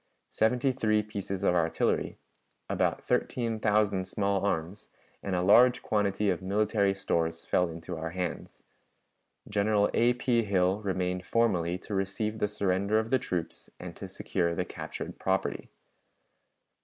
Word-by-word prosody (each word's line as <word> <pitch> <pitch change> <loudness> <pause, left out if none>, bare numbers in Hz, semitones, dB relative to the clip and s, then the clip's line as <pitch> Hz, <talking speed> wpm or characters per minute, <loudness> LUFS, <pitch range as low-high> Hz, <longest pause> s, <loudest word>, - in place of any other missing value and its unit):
Seventy 125 +4 +2
three 110 -4 +1
pieces 100 -2 -5
of 95 - +3
artillery, 85 -2 0 0.5
about - - 0
thirteen 115 -3 -1
thousand 105 -3 +2
small 100 0 0
arms, 90 0 -2 0.3
and 95 -2 -2
a 90 - 0
large 120 +6 +6
quantity 105 -1 +1
of 90 - -3
military 100 +1 +1
stores 85 -4 -1
fell 90 -1 +2
into 80 +2 -7
our 80 +1 -3
hands. 90 0 -5 0.8
General 105 0 +2
A. 120 +1 +4
P. 120 -1 +1
Hill 95 -1 +1
remained 90 -2 -2
formally 90 -5 +1
to 100 - -8
receive 100 +3 -2
the 105 - +2
surrender 100 0 0
of 110 +1 -1
the 130 - +4
troops 90 -7 -4
and - - -8
to - - -7
secure 85 -1 -2
the - - -1
captured - - -7
property. - - -1
100 Hz, 145 wpm, -29 LUFS, 90-110 Hz, 0.8 s, large